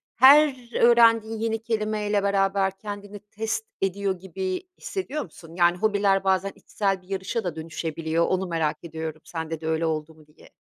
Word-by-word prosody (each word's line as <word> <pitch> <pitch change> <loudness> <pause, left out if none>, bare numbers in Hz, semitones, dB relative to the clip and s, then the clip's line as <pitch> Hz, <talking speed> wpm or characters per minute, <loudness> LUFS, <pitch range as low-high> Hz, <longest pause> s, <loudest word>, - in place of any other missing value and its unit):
her 265 -2 +6
öğrendiğin 230 -2 +5
yeni 225 0 -1
kelimeyle 215 -2 -1
beraber 195 -1 +1
kendini 205 0 -7
test 220 +2 -4 0.2
ediyor 195 -1 -1
gibi 190 0 -4 0.2
hissediyor 305 -6 -4
musun? 165 0 -14
Yani, 175 0 +3
hobiler 200 -1 +2
bazen 190 0 +1
içsel 195 -3 -2
bir 180 - -24
yarışa 195 +4 -3
da 175 -4 -3
dönüşebiliyor, 160 0 -2
onu 185 0 0
merak 160 -3 -1
ediyorum 160 -1 -6
sende 160 -1 -5
de 160 - -4
öyle 160 +1 0
oldu 160 0 -2
mu 155 -1 -20
diye. 150 - -19
195 Hz, 160 wpm, -25 LUFS, 165-215 Hz, 0.2 s, her